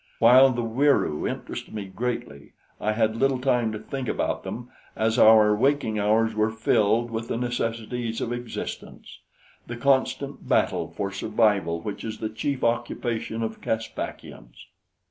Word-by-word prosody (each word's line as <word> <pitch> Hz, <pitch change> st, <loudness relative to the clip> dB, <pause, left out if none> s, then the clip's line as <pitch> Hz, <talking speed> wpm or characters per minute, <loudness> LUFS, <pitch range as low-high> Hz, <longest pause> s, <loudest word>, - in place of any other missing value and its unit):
While 130 Hz, +3 st, +7 dB
the 120 Hz, -2 st, -2 dB
Wieroo 115 Hz, -, +1 dB
interested -, -, -6 dB
me 105 Hz, -2 st, -4 dB
greatly, 95 Hz, -8 st, -5 dB, 0.3 s
I 110 Hz, -, 0 dB
had 110 Hz, 0 st, +1 dB
little 135 Hz, +2 st, +2 dB
time 125 Hz, -3 st, +1 dB
to 110 Hz, -, -4 dB
think 130 Hz, +4 st, -5 dB
about -, -, -1 dB
them, 120 Hz, +1 st, -7 dB, 0.2 s
as 110 Hz, 0 st, +1 dB
our 110 Hz, -1 st, +7 dB
waking 120 Hz, -3 st, +1 dB
hours 110 Hz, +2 st, +2 dB
were 110 Hz, 0 st, +1 dB
filled 110 Hz, +1 st, +1 dB
with 115 Hz, 0 st, -4 dB
the -, -, -2 dB
necessities 115 Hz, -1 st, -3 dB
of 120 Hz, -, -2 dB
existence 120 Hz, -1 st, -7 dB, 0.5 s
the 120 Hz, -, -6 dB
constant 140 Hz, +2 st, 0 dB
battle -, -, +2 dB
for 100 Hz, -1 st, -4 dB
survival 100 Hz, -5 st, +1 dB
which 105 Hz, +3 st, -6 dB
is 110 Hz, -1 st, -5 dB
the 110 Hz, -, -3 dB
chief 130 Hz, +5 st, -3 dB
occupation 115 Hz, -1 st, -1 dB
of 110 Hz, 0 st, -5 dB
Caspakians. 110 Hz, -, -5 dB
115 Hz, 145 wpm, -25 LUFS, 110-120 Hz, 0.5 s, While